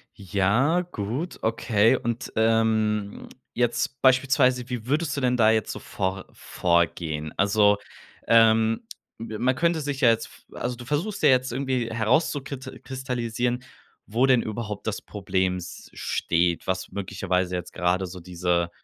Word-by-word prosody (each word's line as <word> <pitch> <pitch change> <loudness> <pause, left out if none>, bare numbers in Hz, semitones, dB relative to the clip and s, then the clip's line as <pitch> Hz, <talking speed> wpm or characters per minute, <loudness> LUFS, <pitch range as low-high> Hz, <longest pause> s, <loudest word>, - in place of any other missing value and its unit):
Ja, 105 - +1
gut, 140 - -5
okay. 115 +1 +3
Und, 120 -1 -3
ähm, 110 -2 +1 0.3
jetzt 120 +2 -1
beispielsweise, 130 -1 +3
wie 120 -3 -4
würdest 150 +1 0
du - - -1
denn 125 0 +2
da 110 -1 +5
jetzt 110 -2 0
so - - -6
vor 95 0 -3
vorgehen? 85 -3 -1
Also, 105 +1 +4 0.5
ähm, 115 -1 +4 0.4
be 110 -1 -6
man 130 +1 +2
könnte 170 +2 +1
sich 140 -1 -3
ja 120 - +6
jetzt 115 0 +1
v - - -19
also, 125 0 -3
du 120 0 -10
versuchst 160 - -2
ja - - +7
jetzt 130 -1 +3
irgendwie 130 -2 -1
herauszukit 130 +3 -1
kristallisieren, 125 -2 -2 0.4
wo 115 +5 +2
denn 130 -3 +4
überhaupt 110 -1 -5
das 110 - -2
Problem 95 -2 -1
s 90 -2 -9
steht, 85 0 0
was 95 0 -2
möglicherweise 90 -2 -2
jetzt 90 -1 -6
gerade 90 +1 0
so 90 +1 -9
diese, 85 0 -1
115 Hz, 145 wpm, -25 LUFS, 100-130 Hz, 0.5 s, ja